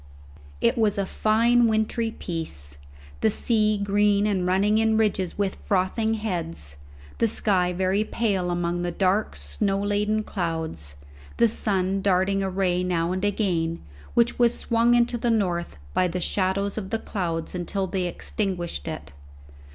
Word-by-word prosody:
It 235 +1 +2
was 215 -3 +2
a 200 - 0
fine 230 +4 +3
wintry 220 +1 0
piece; 75 - -5 0.4
the 110 - +3
sea 215 - +2
green 205 0 +2
and 190 -4 0
running 200 +4 +3
in 220 0 +3
ridges 200 -5 0
with 200 -2 0
frothing 210 +4 0
heads, 165 - -4 0.4
the 230 - +4
sky 190 -4 +2
very 190 +3 +1
pale 200 -6 -1
among 175 0 -1
the 175 - -1
dark 190 +4 +1
snow 75 - -1
laden 210 +1 0
clouds, 160 - -3 0.4
the 235 - +5
sun 195 -3 0
darting 195 0 +2
a 195 - -1
ray 180 -1 0
now 170 -1 0
and 185 +1 -2
again, 175 -5 0 0.4
which 235 +1 +2
was 240 -1 +4
swung 235 +1 +3
into 240 0 +2
the 240 - 0
north 180 - 0 0.2
by 185 - +3
the 180 +1 -3
shadows 195 +3 0
of 190 -3 -7
the 225 - 0
clouds 170 -7 -3
until 185 +2 -2
they 185 -1 -2
extinguished 175 - -3
it. - - -6
195 Hz, 150 wpm, -25 LUFS, 175-215 Hz, 0.4 s, the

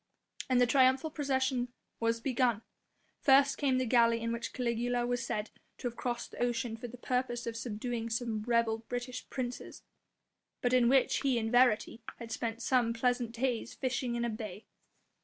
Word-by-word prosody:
And 255 -1 +4
the 245 - +6
triumphal 260 +4 +3
procession 265 -4 0 0.3
was 230 0 +1
begun. 240 -3 +1 0.6
First 275 0 +5
came 270 -3 +2
the 255 - +1
galley 230 -1 +4
in 230 0 -2
which 235 - -4
Caligula 240 0 -1
was 245 0 -1
said 210 +1 -3 0.3
to - - -3
have 240 - -5
crossed 240 -1 -3
the - - -8
ocean 240 -1 0
for 230 +2 -7
the 245 +2 -10
purpose 245 -1 -1
of 230 - -4
subduing 230 0 -3
some 225 -1 -2
rebel 230 0 +1
British 245 +2 -6
princes, 250 -2 -5 0.8
but 245 0 0
in 245 -2 +5
which 265 0 +4
he 270 -3 +1
in 225 -1 -1
verity 245 -2 +3 0.2
had 230 -1 -8
spent 230 0 -3
some 240 -2 +2
pleasant 245 0 0
days 235 -1 -2
fishing 255 -2 -2
in 235 - -1
the 235 - 0
bay. 215 -2 -6
240 Hz, 175 wpm, -32 LUFS, 230-255 Hz, 0.8 s, the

